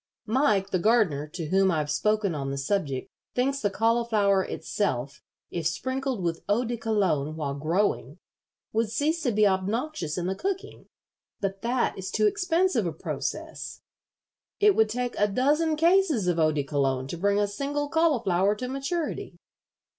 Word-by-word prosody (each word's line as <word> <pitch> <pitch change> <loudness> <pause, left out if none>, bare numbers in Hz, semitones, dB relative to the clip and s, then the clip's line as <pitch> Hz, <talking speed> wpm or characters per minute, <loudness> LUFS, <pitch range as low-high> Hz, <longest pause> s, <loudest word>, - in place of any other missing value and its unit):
Mike, 210 -5 +2
the 185 - +1
gardener, 190 -9 +2
to 165 +2 -6
whom 190 +1 +4
I've 155 -4 0
spoken 210 +3 +1
on 140 -2 -3
the 140 - -3
subject, 140 -2 -2 0.2
thinks 275 +2 +1
the 205 - +1
cauliflower 220 -2 +2
itself, 140 - -3 0.3
if 170 -3 -1
sprinkled 260 +5 -2
with 165 -1 -2
eau 230 +5 +2
de 240 +1 -2
Cologne 190 -10 0
while 145 -3 -3
growing, 155 - -1 0.6
would 225 0 +1
cease 305 +9 0
to 250 - +1
be 215 0 +3
obnoxious 195 - -1
in 175 - -2
the 190 - 0
cooking; 390 - -4 0.5
but 195 -1 -3
that 240 +1 0
is 190 - -4
too 215 - +1
expensive 330 - +2
a - - -1
process. 155 - -5 0.8
It 410 -1 +5
would 220 -1 +4
take 245 +2 -2
a 205 - +4
dozen 295 +9 +2
cases 330 - +3
of 175 -2 +1
eau 155 -1 +4
de 150 -2 -1
Cologne 135 -2 0
to 155 - -5
bring 200 +4 +1
a 205 - +3
single 285 +7 -2
cauliflower 235 - +2
to 250 +4 -5
maturity. 275 +5 -3
205 Hz, 160 wpm, -27 LUFS, 170-255 Hz, 0.8 s, It